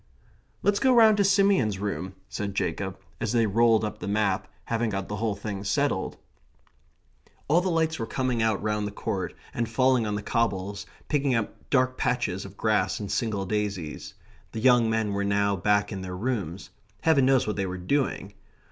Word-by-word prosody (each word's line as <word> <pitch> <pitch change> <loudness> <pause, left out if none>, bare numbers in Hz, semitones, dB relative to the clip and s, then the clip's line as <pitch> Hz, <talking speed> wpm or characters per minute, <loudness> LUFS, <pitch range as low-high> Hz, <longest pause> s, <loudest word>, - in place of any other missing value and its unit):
"Let's 200 0 +3
go 265 - +4
round 220 -3 +7
to 200 - +4
Simeon's 195 - +3
room," 95 -1 -4
said 100 -1 -4
Jacob, 95 +2 -2 0.2
and 115 - -2
they 115 0 +3
rolled 115 +1 +3
up 105 - -5
the 90 - -5
map, 100 -1 0 0.2
having 115 0 0
got 100 -2 -3
the 105 - -4
whole 110 -1 -1
thing 100 -1 -5
settled. 100 -1 0 1.3
All 165 +5 +4
the 185 - -1
lights 160 -2 0
were 115 - -3
coming 130 -3 -1
out 110 -3 +1
round 105 -1 0
the - - -5
court, 100 -2 -3 0.2
and 115 -1 -2
falling 125 -1 +2
on 105 - -1
the 105 - -4
cobbles, 100 -4 -1 0.2
picking 140 -3 +1
out 115 -2 -1 0.2
dark 130 -1 +2
patches 105 -7 -1
of 100 0 -11
grass 105 -4 +1
and 100 -2 -5
single 100 -2 -1
daisies. 100 -6 -3 0.4
The 110 - -3
young 120 -1 +5
men 110 -2 0
were 100 0 -1
now 100 0 +1
back 105 +2 +1
in 95 -2 -4
their 90 -1 -5
rooms. 95 -6 -3 0.3
Heaven 145 -5 +4
knows 135 -2 +4
what 105 - -2
they 95 -1 -1
were 90 0 -4
doing. 100 -1 -1
105 Hz, 185 wpm, -26 LUFS, 100-125 Hz, 1.3 s, round